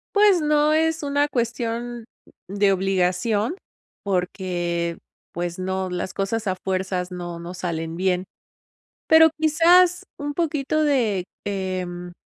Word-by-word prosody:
Pues, 405 -4 +5
no 300 0 +3
es 320 0 +1
una 285 0 +1
cuestión 235 -2 -3 0.4
de 200 +1 +2
obligación, 195 - +1 0.5
porque, 175 -3 -2 0.4
pues 175 0 -3
no. 190 0 -2
Las 180 +1 -4
cosas 210 +3 -2
a 185 - 0
fuerzas, 185 -1 -2
no 175 -1 -6
no 175 +2 -7
salen 165 -2 -4
bien. 185 0 0 0.8
Pero 320 0 +8
quizás, 340 +3 +4
un 290 0 -4
poquito 310 -2 0
de, 230 -11 +1 0.2
em, 185 -3 -4
195 Hz, 115 wpm, -23 LUFS, 180-290 Hz, 0.8 s, Pero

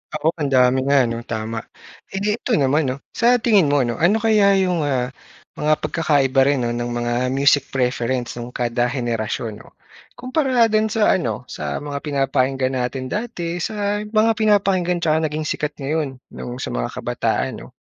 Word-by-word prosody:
Oo, 155 +1 +1
ang 145 - 0
dami 130 0 +3
nga 140 -1 +5
ano 115 -1 -2
tama. 110 0 -3 0.5
Eh, 195 +1 -5 0.2
ito 240 - 0
naman 145 +1 +2
'no, 130 +2 -4
sa 240 +1 +3
tingin 205 -9 +4
mo 145 -1 +3
'no, 120 -1 -3
ano 180 +7 +4
kaya 210 -3 +4
'yong, 185 -3 +1
ah, 125 -2 -1 0.5
mga 150 +1 +3
pagkakaiba 140 -5 +2
rin 140 -3 +1
no 120 - 0
ng 120 0 -2
mga 120 0 -1 0.2
music 140 +1 +3
preference 125 -1 -1
nung 120 +1 -7
kada 120 0 0
henerasyon 115 -3 -3
no, - - -17 0.4
kumpara 255 -3 +1
dun 215 0 +3
sa 220 0 +2
ano 120 - -3
sa - - -4
mga 145 -1 -4
pinapakinggan 135 -2 0
natin 130 +1 -3
dati 180 -7 -3
sa 205 +2 -1
mga 215 +1 +3
pinapakinggan 195 -5 +2
tsaka 160 0 +2
naging 150 +1 -4
sikat 150 0 -2
ngayon 145 -1 -2 0.2
nung 120 - -7
sa - - -4
mga - - -2
kabataan, - - -1
'no? - - -11
140 Hz, 170 wpm, -21 LUFS, 125-190 Hz, 0.5 s, nga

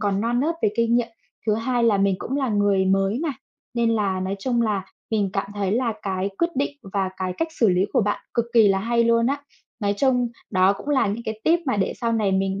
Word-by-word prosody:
còn 200 -1 0
non 240 +2 0
nớt 325 +4 0
về 210 - +3
kinh 230 0 +2
nghiệm, 235 -1 0 0.4
thứ 210 - +3
hai 235 +1 0
là 210 -4 +3
mình 195 -1 +3
cũng 270 - -3
là 265 -3 0
người 205 -2 +2
mới 195 +4 +1
mà. 320 -1 -1 0.4
Nên 235 -1 +2
là 200 -4 0
nói 190 +2 -2
chung 235 +3 0
là 205 -4 0 0.3
mình 205 -3 +1
cảm 195 0 -2
thấy 200 -1 -1
là 235 -1 +1
cái 190 0 -2
quyết 340 - +2
định 285 +1 -1 0.2
và 190 -2 0
cái 185 -1 -2
cách 325 - 0
xử 225 - +5
lý 180 +1 +3
của - - +3
bạn 205 +1 -1
cực 235 - +2
kỳ 220 -3 +7
là 195 0 +3
hay 235 +3 +1
luôn 230 0 +3
á. 280 +2 -1 0.4
Nói 205 0 +1
chung 250 -1 +2 0.2
đó 185 +1 +4
cũng 200 - -9
là 285 -6 +3
những 215 +4 -3
cái 220 0 -5
tip 335 +1 +4
mà 260 - +1
để 195 - 0
sau 230 -1 0
này 210 -4 +1
mình 195 +1 0
215 Hz, 250 wpm, -23 LUFS, 195-240 Hz, 0.4 s, kỳ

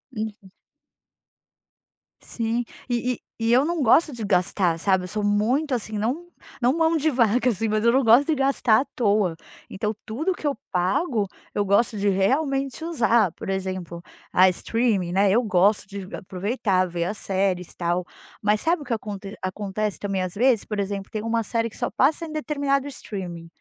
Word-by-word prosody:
Hum. 215 -3 -5 1.7
Sim, 230 +1 -2 0.3
e 245 +1 0
e - - -9 0.2
e 225 +1 +2
eu 255 - +5
não 330 -1 -1
gosto 300 +7 +5
de 235 -4 -6
gastar, 180 -2 +1
sabe, 190 0 +2
eu - - -5
sou 210 +2 -3
muito 245 +8 +1
assim, 220 -2 -4
não 260 +11 -2 0.4
não 245 +3 +3
mão 325 0 +2
de 315 +1 +2
vaca 245 0 +3
assim, 225 0 -1
mas 215 0 0
eu 235 - +5
não 265 +2 +3
gosto 235 +5 +6
de 315 - +2
gastar 270 -4 +3
à - - -4
toa. 205 -7 +2 0.3
Então 210 +2 -3
tudo 310 +13 -1
que 315 - -10
eu 285 - 0 0.2
pago, 200 - +1 0.3
eu 205 - +1
gosto 215 +3 +2
de 200 0 +1
realmente 270 - 0
usar, 235 - +2
por - - -8
exemplo, 185 -3 -4 0.3
ah, 185 +1 +6
streaming, 205 -2 0
né, 195 +2 +3
eu 240 +4 +3
gosto 200 0 +2
de 195 -2 -7
aproveitar, 190 0 -1
ver 170 0 -2
as 205 +4 -3
séries 190 -2 -1
e - - -17
tal, 175 +1 0 0.4
mas 210 0 +2
sabe 330 -1 +1
o - - -8
que 245 - -2
aconte 205 -2 -6
acontece 200 +2 -3
também 195 -2 -2
às 180 - -4
vezes? 240 0 +2
Por 210 -2 -4
exemplo, 195 0 -3
tem 215 -2 -3
uma 230 0 0
série 230 +1 -1
que - - -14
só 245 - -1
passa 300 +5 +2
em 315 - -8
determinado 285 -2 -1
streaming 185 -10 -6
215 Hz, 185 wpm, -24 LUFS, 195-255 Hz, 1.7 s, gosto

